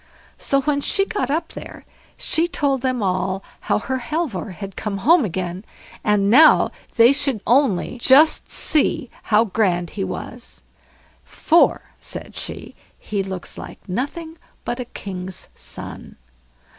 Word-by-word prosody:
So, 275 0 +1
when 285 0 0
she 390 +6 +2
got 420 -6 -2
up 315 +4 -1
there, - - -10 0.3
she 330 +2 +1
told 280 -6 0
them 255 -3 -1
all 185 +1 -1 0.2
how - - 0
her 260 +4 -3
Halvor 240 - -3
had 195 +1 -8
come 210 -2 -3
home 330 -1 +6
again, 180 -1 -3 0.4
and 210 -2 +2
now 295 +9 +6 0.2
they 235 +2 +7
should 275 -5 0
only 245 -2 +2
just 285 +6 +5
see 285 -5 +1 0.2
how 215 +1 +5
grand 180 -5 0
he 195 - -3
was, 240 +5 -7 0.6
for, 340 +1 +3 0.2
said - - -9
she, - - -6 0.2
"he 205 -2 -3
looks 190 -2 -6
like - - -11
nothing 315 - -4 0.3
but 240 +1 -3
a 250 - -3
king's 185 -4 -6
son". - - -9
240 Hz, 140 wpm, -21 LUFS, 195-285 Hz, 0.6 s, they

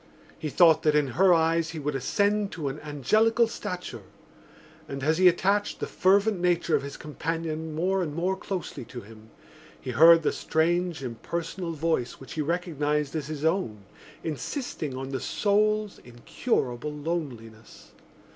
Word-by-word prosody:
He 155 - -3
thought 160 +1 +5
that 155 -2 +2
in 145 -2 +2
her 180 +10 +4
eyes 165 -1 +3
he 165 - -7
would 150 0 -2
ascend 200 +10 0
to 150 -5 -3
an 135 +3 -6
angelical 215 - +2
stature; 180 - -6 0.9
and, 140 -1 -6
as 155 +3 +2
he 185 - +7
attached 195 +4 +2
the - - -2
fervent 200 +1 +2
nature 175 -2 +2
of - - +1
his 140 0 -7
companion 160 0 -4
more 185 +4 +1
and 150 -4 -3
more 180 +3 0
closely 190 -7 -5
to 120 - -8
him, 110 +1 -15 0.5
he 130 - -5
heard 165 +6 +7
the - - +2
strange 170 0 0
impersonal 165 +8 -4
voice 160 -5 -1
which 135 - -11
he 155 - -2
recognised 150 -3 -1
as 150 -3 -3
his 155 -1 -4
own, 140 - 0 0.4
insisting 155 - -4
on 135 0 -5
the 135 -1 -3
soul's 210 - +1
incurable 125 - -2
loneliness. 140 -8 -6
160 Hz, 155 wpm, -27 LUFS, 140-180 Hz, 0.9 s, he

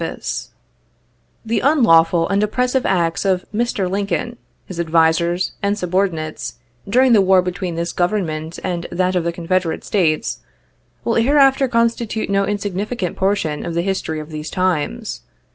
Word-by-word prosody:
PRE - - -1
E - - -5
AC - - -4
E - - -37 0.9
The 225 +1 0
unlawful 175 - +4
and 200 0 +1
oppressive 250 +4 0
acts 170 -3 +1
of 190 -2 +1
Mr. 215 -4 0
Lincoln, 200 +5 -2 0.3
his 180 -3 -8
advisers, 170 +2 +2
and 200 +1 0
subordinates, 180 -4 -2 0.3
during 255 +3 +4
the 210 - +6
war 190 -1 +4
between 180 -1 -3
this 170 +1 -3
Government 170 -4 -1
and 175 -2 -3
that 185 +1 0
of 180 - +1
the 170 - 0
Confederate 170 0 -1
States, 165 -7 0 0.7
will 230 - +1
here 260 +7 +3
after 270 -1 +5
constitute 230 -3 0
no 195 0 +2
insignificant 205 -1 -3
portion 190 -6 0
of 170 -1 -4
the 170 - +1
history 185 -5 -2
of 155 +1 -9
these 155 0 -5
times. 180 - -1
185 Hz, 160 wpm, -19 LUFS, 170-210 Hz, 0.9 s, the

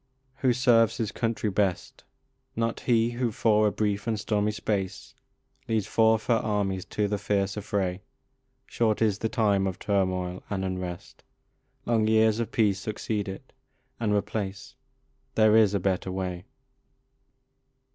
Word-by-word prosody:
HO 130 -1 +2
serves 120 -2 +3
his 110 -3 -2
country 115 -2 -1
best? 95 -2 -1 0.5
Not 115 0 -1
he 115 -1 +2
who, 120 -1 -1
for 110 0 +3
a - - +1
brief 105 0 -1
and 110 -2 0
stormy 105 0 0
space, 100 -3 -3 0.5
Leads 110 -3 0
forth 110 0 +3
her 120 - +3
armies 100 -4 -1
to 105 -1 -1
the 105 0 -2
fierce 100 -1 0
affray. 100 -3 -2 0.6
Short 110 -4 0
is 105 -2 +1
the 110 - -1
time 100 -5 +2
of 95 - -3
turmoil 95 -2 -1
and 95 -2 -2
unrest, 90 -2 -6 0.6
Long 110 -2 +2
years 110 0 +3
of 115 - -2
peace 105 -4 +2
succeed 105 -1 -3
it 95 - -9 0.5
and 110 -3 0
replace: 105 +4 -2 0.6
There 110 -1 +5
is 105 -3 +5
a - - +2
better 95 0 -1
way. 90 -1 -4
105 Hz, 145 wpm, -27 LUFS, 95-110 Hz, 0.6 s, There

